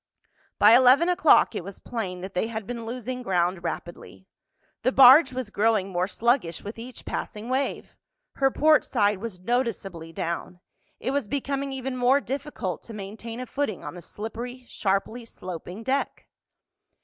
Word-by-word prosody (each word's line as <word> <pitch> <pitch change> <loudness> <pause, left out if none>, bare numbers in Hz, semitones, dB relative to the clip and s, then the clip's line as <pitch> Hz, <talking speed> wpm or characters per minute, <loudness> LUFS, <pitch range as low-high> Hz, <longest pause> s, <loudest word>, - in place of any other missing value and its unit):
By 210 - +7
eleven 260 +8 +6
o'clock 325 -8 +5
it 205 - -4
was 195 +1 -9
plain 190 -7 -5
that 190 +1 -7
they 180 - 0
had 220 -2 -5
been 235 0 -6
losing 250 +1 -5
ground 180 -4 0
rapidly. 175 +2 -7 0.6
The 255 - +2
barge 265 +2 +8
was 255 -4 -5
growing 210 -2 +2
more 180 0 0
sluggish 230 - 0
with 210 +3 -7
each 245 +1 -9
passing 215 +3 -5
wave. 265 +2 -2 0.4
Her 270 -1 +4
portside 245 -9 +3
was 210 -4 -6
noticeably 195 -7 -2
down—it 175 +8 -6
was 280 -5 -1
becoming 275 +2 -2
even 265 -1 -4
more 255 +2 +4
difficult 275 - -4
to 230 - -10
maintain 220 +3 -7
a 255 - -4
footing 255 -7 -3
on - - -6
the 175 - -9
slippery, 240 +7 -7
sharply 200 +4 -1
sloping 185 -1 -8
deck. 270 +3 -2
230 Hz, 150 wpm, -26 LUFS, 195-255 Hz, 0.6 s, barge